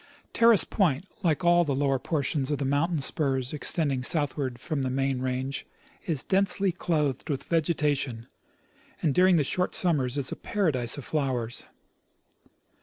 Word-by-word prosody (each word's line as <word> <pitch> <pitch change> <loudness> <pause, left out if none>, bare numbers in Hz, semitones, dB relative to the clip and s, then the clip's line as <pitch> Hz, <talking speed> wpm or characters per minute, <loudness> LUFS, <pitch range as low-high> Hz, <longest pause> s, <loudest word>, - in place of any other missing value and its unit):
Terrace 230 -3 +6
point, 175 -5 0 0.2
like 170 +1 0
all 175 0 +5
the 145 -4 -1
lower 135 -1 +1
portions 140 0 -1
of 145 - 0
the 140 - -3
mountain 145 +4 0
spurs 135 -2 +1
extending 145 -3 +1
southward 135 -3 0
from 155 +1 -3
the 130 - -1
main 135 0 -1
range, 130 +1 -3 0.4
is 155 -6 -1
densely 195 0 +1
clothed 155 -6 -2
with 140 -3 -2
vegetation, 150 -7 -1 0.8
and 150 - +2
during 185 +2 +5
the 155 - +3
short 180 +6 -1
summers 145 -7 +1
is 135 -2 0
a - - -3
paradise 150 - -1
of 145 - -7
flowers. 130 -6 -2
145 Hz, 150 wpm, -27 LUFS, 130-170 Hz, 0.8 s, Terrace